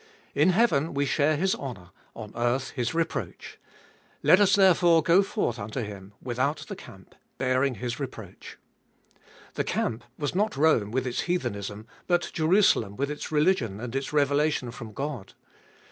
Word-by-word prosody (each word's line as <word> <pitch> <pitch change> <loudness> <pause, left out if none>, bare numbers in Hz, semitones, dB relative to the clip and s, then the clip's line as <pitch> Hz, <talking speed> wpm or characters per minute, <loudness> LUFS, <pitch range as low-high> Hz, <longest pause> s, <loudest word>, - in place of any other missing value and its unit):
In 150 +5 +4
heaven 175 -7 +2
we 140 +1 +1
share 150 +2 +2
His 190 +4 +1
honour; 95 -11 -7 0.2
on 110 -2 -8
earth 120 +3 0
His 120 +2 -2
reproach. 165 -1 -3 0.6
Let 185 - +6
us 200 -1 +5
therefore 175 -4 +5
go 170 +5 +5
forth 195 - -2
unto 110 +5 -4
Him, 100 -1 -9
without 130 +4 -2
the - - -6
camp, - - -14 0.2
bearing 130 0 +1
His 120 +3 -4
reproach. 110 -8 -8 1.0
The - - -1
camp 115 +1 -2
was 145 -2 -2
not 205 -3 0
Rome 140 -9 +3
with 130 +3 -1
its 125 - -2
heathenism, 105 - -3 0.2
but 175 -1 +1
Jerusalem 160 - +3
with 140 +4 -2
its 150 - -6
religion 150 - +1
and 125 +2 -6
its 135 0 -2
revelation 145 -3 +1
from 115 -2 -9
God. 135 -3 -5
140 Hz, 155 wpm, -27 LUFS, 115-160 Hz, 1.0 s, Let